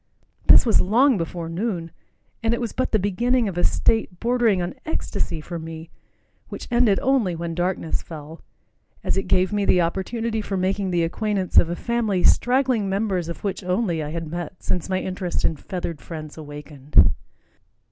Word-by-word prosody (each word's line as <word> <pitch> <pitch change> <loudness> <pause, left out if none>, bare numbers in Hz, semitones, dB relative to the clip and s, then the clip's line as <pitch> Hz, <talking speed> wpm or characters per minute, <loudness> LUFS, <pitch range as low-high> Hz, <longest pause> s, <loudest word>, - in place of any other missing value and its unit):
This - - +8
was 225 - +4
long 245 +7 +4
before 170 -2 -4
noon, 170 -1 -3 0.5
and 230 0 +1
it - - -5
was 235 -2 -3
but 255 - -1
the 220 - +4
beginning 230 +5 +1
of 190 - -4
a 175 - -1
state 215 -5 +1
bordering 235 -4 +2
on 175 0 -2
ecstasy 170 - -3
for 170 +2 -6
me 160 0 -8 0.6
which - - -7
ended 235 -5 +4
only 245 -9 +2
when 170 0 -4
darkness 175 -1 -1
fell, 160 0 -10 0.6
as - - 0
it 195 - -1
gave 185 +1 +2
me 205 -1 +1
the 180 -2 +4
opportunity 220 +6 -2
for 200 -2 -3
making 190 +1 0
the 175 -2 +1
acquaintance 195 +2 +2
of 165 - +1
a 175 - -2
family, 220 -4 -1
straggling 250 -4 +3
members 190 -4 -1
of 170 - -7
which, 200 -1 -3
only, 180 -2 0
I 150 - -4
had 165 +1 -4
met 175 +3 -6
since 180 0 -2
my 185 0 +1
interest 185 -1 -3
in 160 - +2
feathered 170 0 -5
friends 155 -3 -8
awakened. 145 - +1
185 Hz, 180 wpm, -23 LUFS, 170-220 Hz, 0.6 s, This